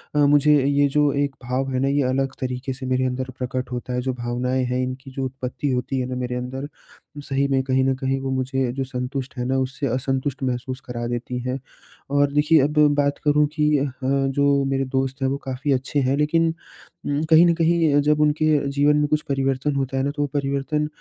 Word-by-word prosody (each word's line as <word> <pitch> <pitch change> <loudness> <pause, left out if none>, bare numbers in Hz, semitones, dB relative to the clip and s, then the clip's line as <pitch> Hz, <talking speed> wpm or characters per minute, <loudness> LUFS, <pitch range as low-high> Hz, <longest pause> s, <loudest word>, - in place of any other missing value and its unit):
अ, - - +1
मुझे 145 +1 +5
ये 140 0 +3
जो 145 0 +3
एक 140 -1 -1
भाव 130 +2 -1
है 130 - 0
ना 135 - +2
ये 140 0 +2
अलग 135 +1 0
तरीके 130 +1 -3
से 130 0 -8
मेरे 130 0 +1
अंदर 130 +1 -2
प्रकट 125 0 -4
होता 125 0 -4
है। 125 - 0
जो 130 0 -2
भावनाएँ 125 +1 -1
हैं 125 +1 -1
इनकी 130 +1 -6
जो 135 0 -3
उत्पत्ति 130 +2 -4
होती 130 +1 -1
है 125 - -1
ना 130 - -3
मेरे 125 -1 -3
अंदर, 125 +2 -4
वो 145 0 -13
सही 140 0 0
में 135 -1 +2
कहीं 130 0 +1
न 135 0 +2
कहीं 135 0 -1
वो 135 0 -4
मुझे 130 -1 -1
जो 135 0 -2
संतुष्ट 130 +1 -5
है 125 - -2
ना, 135 +1 0
उससे 130 +1 -2
असंतुष्ट 135 +2 -2
महसूस 130 +1 -3
करा 120 -1 -4
देती 120 +1 -3
हैं। 130 +2 -2 0.5
और 145 0 +3
देखिए 150 +1 +4
अब 150 +2 +1 0.2
बात 140 0 0
करूँ 150 0 +4
कि 150 -1 +3
अ, 140 -1 -1
जो 140 +1 +2
मेरे 135 0 0
दोस्त 135 +1 -2
हैं 135 - +2
वो 140 - -1
काफ़ी 135 +2 -2
अच्छे 135 +3 -1
हैं 130 +1 +1
लेकिन 165 +2 +2 0.6
उम, 145 +2 0
कहीं 165 +2 +7
न 170 - +4
कहीं 165 -3 +3
जब 150 +1 +2
उनके 150 +1 +2 0.3
जीवन 145 +1 +3
में 150 0 +2
कुछ 150 +1 +1
परिवर्तन 135 +1 0
होता 135 -1 -1
है 135 - +1
ना 140 - 0
तो 145 - -2
वो 145 - +1
परिवर्तन 140 +2 -1
135 Hz, 225 wpm, -23 LUFS, 130-145 Hz, 0.6 s, कहीं